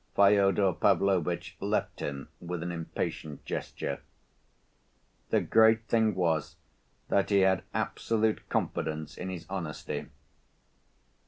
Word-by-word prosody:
Fyodor 100 -1 +5
Pavlovitch 90 0 +1
left - - -1
him 70 -1 -4
with 85 -1 -4
an 85 - -3
impatient 80 -3 -4
gesture. - - -4 1.3
The - - +3
great 110 0 +5
thing 110 -3 +2
was 85 -4 0 0.5
that 100 - +2
he 100 -1 +4
had 95 -1 +4
absolute 110 -1 0
confidence 75 -1 -2
in 90 - -5
his 90 -3 -6
honesty. 90 -5 -4
95 Hz, 105 wpm, -29 LUFS, 85-100 Hz, 1.3 s, Fyodor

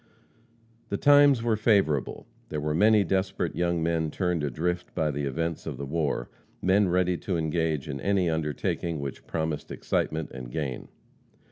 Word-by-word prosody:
The 100 - -1
times 145 -3 +6
were 115 -2 +2
favorable. 100 - +1 0.2
There 75 - -3
were 75 +1 -1
many 105 +5 +5
desperate 95 -1 -1
young 85 -1 0
men 80 -1 0
turned 90 -1 -1
adrift 90 +6 -2
by 75 -1 +1
the 70 0 -3
events 80 +5 -3
of 75 -5 -4
the 70 - -4
war; 75 -4 -1 0.3
men 95 +1 +3
ready 90 0 +2
to 90 -1 -2
engage 80 -2 -1
in 70 -2 -5
any 95 +1 +2
undertaking 80 0 -1
which 70 -1 -6
promised 80 -2 -3
excitement 80 -1 -2
and 65 -2 -8
gain. 65 -2 -4
80 Hz, 155 wpm, -27 LUFS, 75-95 Hz, 0.3 s, times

